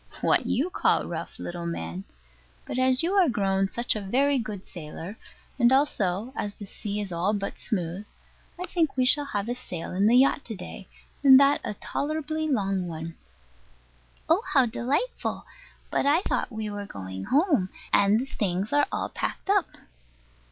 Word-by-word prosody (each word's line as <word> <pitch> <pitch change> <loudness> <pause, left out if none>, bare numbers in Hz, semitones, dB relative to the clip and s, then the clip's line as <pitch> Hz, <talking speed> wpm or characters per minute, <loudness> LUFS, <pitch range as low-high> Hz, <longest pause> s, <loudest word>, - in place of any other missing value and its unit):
What - - +3
you 315 +8 0
call - - +2
rough, - - -6
little 175 -1 -5
man. 90 - -5 0.6
But 255 - -3
as 255 +2 +3
you 350 +4 +1
are 380 -6 +5
grown 195 -4 +1
such 235 +4 -1
a 215 - -3
very 270 +7 +2
good 210 -4 -5
sailor, 170 +3 -8 0.4
and 240 0 +5
also 235 -5 +1
as 205 0 -3
the 205 - -9
sea 205 +1 -5
is 200 -3 -4
all 180 +5 +1
but 200 -1 -4
smooth, 185 -1 -3 0.5
I 360 - -2
think 325 -7 0
we 255 -1 +3
will 290 -1 -4
have 205 -7 -3
a 240 - 0
sail 180 -9 -6
in 195 +3 +2
the 240 +3 +6
yacht 275 +2 +4
to 225 - -5
day, 190 +1 -9 0.4
and 265 -1 +9
that 280 +1 +4
a 210 - -3
tolerably 310 +5 -2
long 195 -9 0
one. 165 0 -6 1.1
Oh, - - +4
how 265 - +7
delightful! 260 - -2 0.5
but - - +1
I 305 +5 +4
thought - - -1
we 220 -1 -4
were 205 -1 -5
going 95 - -7
home; 285 - +2 0.2
and 200 +3 +5
the - - -3
things 200 -3 -2
are 290 0 +4
all - - -2
packed 390 - -3
up. 400 -3 +3
215 Hz, 175 wpm, -26 LUFS, 190-275 Hz, 1.1 s, and